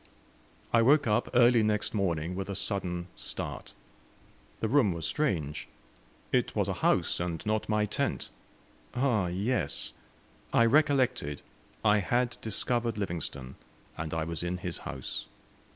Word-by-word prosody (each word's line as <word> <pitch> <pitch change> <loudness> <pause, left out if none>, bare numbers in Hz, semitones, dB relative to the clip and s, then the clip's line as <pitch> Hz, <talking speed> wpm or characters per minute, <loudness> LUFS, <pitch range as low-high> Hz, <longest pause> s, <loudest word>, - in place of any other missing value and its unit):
I 115 - +6
woke 140 +5 +5
up 110 +1 +1
early 120 -1 +6
next 105 -1 0
morning 85 -5 0
with 95 +1 -4
a 100 - -3
sudden 90 -3 -2
start. - - -5 0.8
The 110 - 0
room 115 -6 +4
was 85 -2 -3
strange! 80 - -1 0.6
It - - +1
was - - +1
a - - 0
house, - - +2
and 85 -2 -3
not 110 0 0
my 105 -1 +2
tent! 100 - -2 0.6
Ah, 120 -7 +2
yes! 100 +9 -1 0.6
I 115 - +6
recollected 130 - +2 0.4
I 105 0 +5
had 120 +4 0
discovered 115 +1 -1
Livingstone, 80 -9 -4 0.4
and 80 -1 -4
I 80 -1 -1
was 85 0 -3
in 90 +1 -2
his - - -5
house. 65 -1 -5
105 Hz, 135 wpm, -30 LUFS, 85-120 Hz, 0.8 s, I